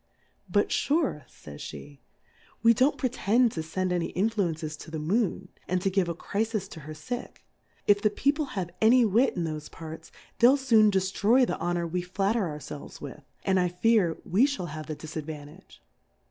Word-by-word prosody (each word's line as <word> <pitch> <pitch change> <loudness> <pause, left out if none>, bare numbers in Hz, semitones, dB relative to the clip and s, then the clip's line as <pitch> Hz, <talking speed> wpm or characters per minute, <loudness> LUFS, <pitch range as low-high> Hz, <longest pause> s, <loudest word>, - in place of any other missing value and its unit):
But - - +2
iuvc^ 280 - 0
fays 70 -1 -12
pt^ 70 0 -9 0.6
we 230 0 +7
don't 260 +6 +2
pretend 245 -2 +2
to 160 - -3
fend 180 +3 -2
any 175 -1 0
Influences 175 -6 -1
to 160 - -10
the 160 - -4
Moon, 185 +3 0 0.2
and 185 - +1
to 195 - +1
give 185 -2 +1
a 170 - -2
Crifis 215 +2 -2
to - - -9
her 155 +1 -9
Sick; 245 +11 -7 0.4
if 205 0 +4
the 210 - +4
People 285 +8 +1
have 175 -2 -2
any 235 +2 +6
Wit 225 +5 +3
in 175 - -1
thofe 155 -2 -4
Parts, 160 0 -9 0.3
they'll 250 +4 +7
foon 230 -6 +5
deftroy 205 +6 +3
the - - -3
Honour 175 0 -1
we 175 +2 -2
flatter 195 +3 0
our 150 -2 -5
felves 150 0 -9
with, 145 +1 -8 0.2
and 190 -1 +2
I 180 - +2
fear, 180 -1 +2
we 225 +10 +4
fliall 185 - -4
have 155 +1 -7
the 155 - -4
Diladvantage. 155 +2 -9
185 Hz, 180 wpm, -27 LUFS, 160-225 Hz, 0.6 s, we